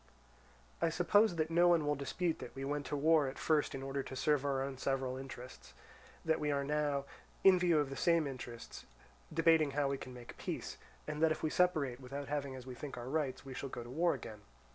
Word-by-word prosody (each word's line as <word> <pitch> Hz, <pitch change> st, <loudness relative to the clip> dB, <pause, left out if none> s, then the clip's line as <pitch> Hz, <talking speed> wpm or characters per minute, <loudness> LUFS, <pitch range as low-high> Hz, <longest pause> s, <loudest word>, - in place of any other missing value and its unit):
"I 165 Hz, -, +3 dB
suppose 180 Hz, +5 st, +4 dB
that 160 Hz, 0 st, -1 dB
no 175 Hz, +1 st, +5 dB
one 170 Hz, -3 st, +4 dB
will 145 Hz, -, +2 dB
dispute 150 Hz, +5 st, -2 dB
that 120 Hz, -, -8 dB
we 135 Hz, 0 st, -4 dB
went 145 Hz, 0 st, -2 dB
to -, -, -2 dB
war 155 Hz, 0 st, +4 dB
at 135 Hz, -, -5 dB
first 155 Hz, -3 st, +1 dB
in 135 Hz, -, -5 dB
order 135 Hz, 0 st, -2 dB
to 130 Hz, -, -7 dB
serve 145 Hz, +1 st, +2 dB
our 135 Hz, -2 st, 0 dB
own 135 Hz, -1 st, -5 dB
several 135 Hz, -2 st, -1 dB
interests, 130 Hz, -1 st, -9 dB, 0.5 s
that 160 Hz, -1 st, +2 dB
we 150 Hz, -, -1 dB
are 140 Hz, -1 st, 0 dB
now, 145 Hz, -1 st, 0 dB, 0.4 s
in 190 Hz, -2 st, +7 dB
view 175 Hz, -2 st, +3 dB
of 145 Hz, -2 st, +1 dB
the -, -, -4 dB
same 170 Hz, -1 st, +3 dB
interests, 125 Hz, -4 st, -7 dB, 0.4 s
debating 160 Hz, -1 st, +4 dB
how 145 Hz, -1 st, +2 dB
we 135 Hz, -1 st, -2 dB
can 130 Hz, -, -8 dB
make 120 Hz, -1 st, -11 dB
peace; -, -, -4 dB, 0.3 s
and 155 Hz, 0 st, -4 dB
that 160 Hz, -1 st, +5 dB
if 155 Hz, -, -2 dB
we 155 Hz, -, +1 dB
separate 155 Hz, -9 st, +2 dB
without 140 Hz, +2 st, -6 dB
having 140 Hz, -2 st, -2 dB
as 130 Hz, -1 st, -9 dB
we 130 Hz, -, -7 dB
think 140 Hz, +3 st, -7 dB
our 120 Hz, +1 st, -6 dB
rights, 135 Hz, -3 st, -1 dB
we 135 Hz, -, -7 dB
shall 135 Hz, +2 st, -5 dB
go 120 Hz, -, -6 dB
to 120 Hz, -, -10 dB
war 170 Hz, +5 st, +2 dB
again. 110 Hz, -2 st, -9 dB
145 Hz, 230 wpm, -35 LUFS, 135-160 Hz, 0.5 s, in